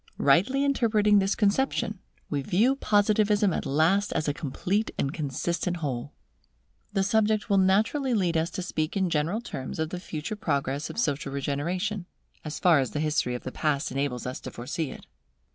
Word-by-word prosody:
Rightly 200 - +3
interpreting 215 -6 +3
this 195 +1 +1
conception, 210 -1 +1 0.3
we 145 -2 -1
view 220 - +2
Positivism 210 -3 +3
at - - -2
last 160 +9 +2
as 155 - -1
a 145 - +1
complete 180 +9 -1
and 140 +1 -1
consistent 170 +4 -2
whole. 140 -4 -3 0.8
The 195 -2 +1
subject 215 +1 +1
will 200 - +5
naturally 220 +8 +2
lead 180 -5 +1
us 160 +1 +1
to 185 - -3
speak 155 -1 -2
in 190 -3 +1
general 165 +9 0
terms 130 - -6
of 160 0 -2
the 180 - -4
future 160 +3 -5
progress 140 -6 -1
of - - -8
social 145 - -1
regeneration, 175 +8 -2 0.4
as 155 -1 -5
far 170 -5 +5
as 130 - 0
the 150 - -3
history 150 -5 0
of 125 - -6
the 130 - -5
past 150 -1 -1
enables 135 -2 -2
us 125 0 -4
to - - -7
foresee 135 +5 -4
it. - - -10
175 Hz, 180 wpm, -27 LUFS, 145-210 Hz, 0.8 s, will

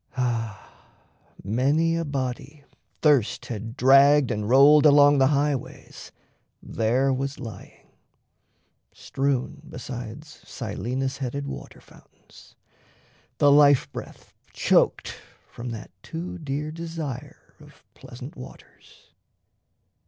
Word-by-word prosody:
Ah, 115 -4 -4 0.6
many 140 - +1
a 165 - -1
body 140 0 -5 0.4
thirst 145 -8 +2
had 115 +2 -7
dragged 140 +2 +5
and 105 0 -3
rolled 140 +4 +6
Along 145 -1 +6
the 135 - +5
highways 145 -1 -3 0.5
there 125 +5 0
was 135 +2 -4
lying 115 -5 -11 1.0
strewn 135 -2 -3
Besides 125 +4 -9
Silenus 125 +4 -4
headed 140 +1 -4
water - - -9
fountains, - - -20 0.8
The 145 -1 +4
life 145 -2 +5
breath - - -10 0.2
choked - - +1 0.3
from 120 +1 -8
that 115 -2 -8
too 170 - -7
dear 150 0 -4
desire 155 -5 -7
Of - - -18
pleasant 130 +6 -11
waters. 125 - -15
135 Hz, 100 wpm, -24 LUFS, 125-145 Hz, 1.0 s, rolled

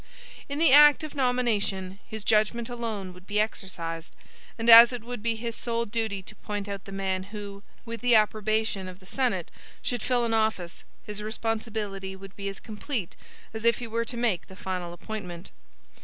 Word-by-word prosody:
In 280 - -3
the 325 -2 +5
act 295 +1 +8
of 310 - -6
nomination, 220 -8 0
his 220 -2 -6
judgment 220 +3 +2
alone 220 -6 -4
would 180 +1 -16
be 210 0 0
exercised; 170 -6 -3 0.4
and 225 0 -3
as 230 +1 +11
it 245 -3 -5
would 245 -2 -6
be 230 +1 0
his 230 0 -4
sole 235 -1 -1
duty 210 -3 -2
to 215 - -12
point 205 -1 -4
out 200 -1 -6
the 195 - -9
man 190 -1 -1
who, 200 -1 -8 0.2
with 230 0 -6
the 245 -1 +5
approbation 215 -2 +1
of 185 -1 -9
the 185 - -18
Senate, 205 -6 -1 0.3
should 245 -2 -2
fill 245 -1 +1
an 230 - 0
office, 220 -6 0 0.2
his 210 0 -4
responsibility 215 -3 -3
would 195 0 -12
be 200 -1 -4
as 195 - -7
complete 215 - -5 0.4
as 220 0 -6
if 235 0 +4
he 245 - -5
were 230 +1 -1
to 240 - -4
make 230 -7 0
the 190 - -12
final 185 -3 -4
appointment. 180 -2 -7
215 Hz, 185 wpm, -27 LUFS, 195-235 Hz, 0.4 s, as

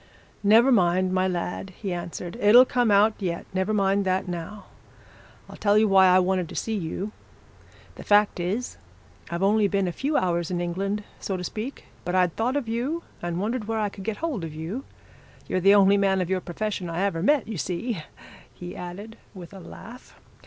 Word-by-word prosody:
'Never 225 +6 +5
mind, 185 -3 +3
my 185 0 +2
lad!' 180 +1 -4
he 195 -4 -3
answered. 175 +1 -6
'It'll 240 +3 +7
come 245 -2 +1
out 205 +2 +5
yet. 175 -4 -3
Never 190 +2 0
mind 200 -1 +2
that, 185 0 0
now. 180 +4 -6 0.8
I'll - - -11
tell 205 0 +3
you 215 0 +4
why 190 -1 +6
I 180 0 +6
wanted 185 -2 +1
to - - -9
see 225 - -2
you. 195 +1 -3 0.9
The - - -8
fact 205 -2 +3
is, 200 +8 -3 0.5
I've 170 +2 -3
only 210 +1 +3
been 195 -1 0
a - - -1
few 285 - -1
hours 175 -2 0
in 180 -1 -2
England, 195 +4 -2 0.2
so 190 - -3
to 180 - -5
speak, 225 +9 -6 0.2
but 180 +1 -2
I'd 180 -2 +2
thought 245 +4 0
of 285 -5 -1
you, 255 +9 -2 0.2
and 175 0 -3
wondered 220 +3 -2
where 225 0 -1
I 210 -1 0
could 195 -1 -10
get 220 +1 -3
hold 305 - -3
of 160 -2 -6
you 175 - -5 0.6
you're 185 - 0
the 195 +3 +6
only 200 0 +5
man 195 -1 +2
of 180 0 -2
your 185 -1 0
profession 185 0 -4
I 165 +2 -2
ever 195 -5 -1
met, 290 - +2
you 215 -6 -5
see,' 185 +3 -3 0.5
he 175 0 -9
added, 195 +5 -8 0.2
with 180 0 -10
a 195 - -9
laugh. 230 +7 -12
195 Hz, 200 wpm, -25 LUFS, 180-215 Hz, 0.9 s, It'll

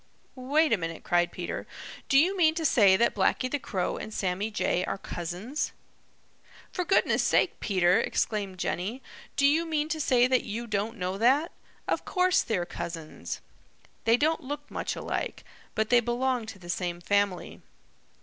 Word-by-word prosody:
"Wait 280 +3 +2
a - - +4
minute," 165 -1 -5
cried 175 0 +2
Peter. 175 - -5 0.4
"Do 275 - +5
you 355 +7 +4
mean 320 -4 +4
to 325 -1 -2
say 200 -9 +5
that 235 - +3
Blacky 230 +6 +1
the 290 - 0
Crow 190 -8 -2
and 215 - -6
Sammy 195 +1 -1
Jay 185 -4 0
are 195 - -3
cousins?" 185 - -4 1.0
"For 360 - -2
goodness' 370 +3 +3
sake, - - +2
Peter!" 185 -3 +3
exclaimed 200 -4 -1
Jenny, 200 +8 -3 0.3
"do 280 - +3
you 305 +4 +4
mean 310 -2 -1
to 315 -1 -1
say 250 -3 +4
that 255 -1 +2
you 230 +3 -4
don't 215 +1 -2
know 185 +1 -3
that? 275 +8 +3 0.4
Of - - 0
course 365 -1 +2
they're 185 -6 -1
cousins. 160 - -6 0.6
They 230 +1 +5
don't 315 +4 +1
look 290 +1 -6
much - - -3
alike, - - -4 0.3
but 220 +1 0
they 245 - +7
belong 240 0 -1
to 220 -2 -8
the 175 -2 -13
same 175 0 -2
family. 200 0 0
225 Hz, 170 wpm, -28 LUFS, 185-280 Hz, 1.0 s, they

